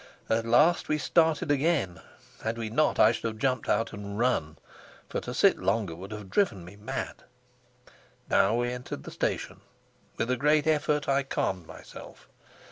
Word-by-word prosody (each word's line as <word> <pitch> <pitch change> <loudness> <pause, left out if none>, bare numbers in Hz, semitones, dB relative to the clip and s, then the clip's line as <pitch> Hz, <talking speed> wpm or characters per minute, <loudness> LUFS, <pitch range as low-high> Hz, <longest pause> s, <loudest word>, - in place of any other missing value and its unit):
At 115 +1 +1
last 150 +9 +4
we 155 - +2
started 160 0 +2
again; 140 - +1 0.4
had 110 +1 -2
we 110 -2 -4
not, 155 +7 +2
I 110 - +6
should 115 - -5
have 110 -1 -2
jumped 130 +1 -1
out 115 - +1
and 100 0 -6
run, 115 -11 0 0.5
for - - -3
to - - -6
sit - - +4
longer 95 -1 0
would 95 +4 -9
have 105 -3 -8
driven 105 - +1
me 90 +3 -12
mad. 105 +1 -5 1.0
Now 100 +4 +3
we 120 +1 0
entered 125 0 -6
the - - -8
station. - - -3 0.6
With 120 - -1
a 125 - +1
great 150 +2 +3
effort 150 -1 +1
I 140 0 +3
calmed 95 -10 -2
myself. - - -12
120 Hz, 170 wpm, -28 LUFS, 105-145 Hz, 1.0 s, I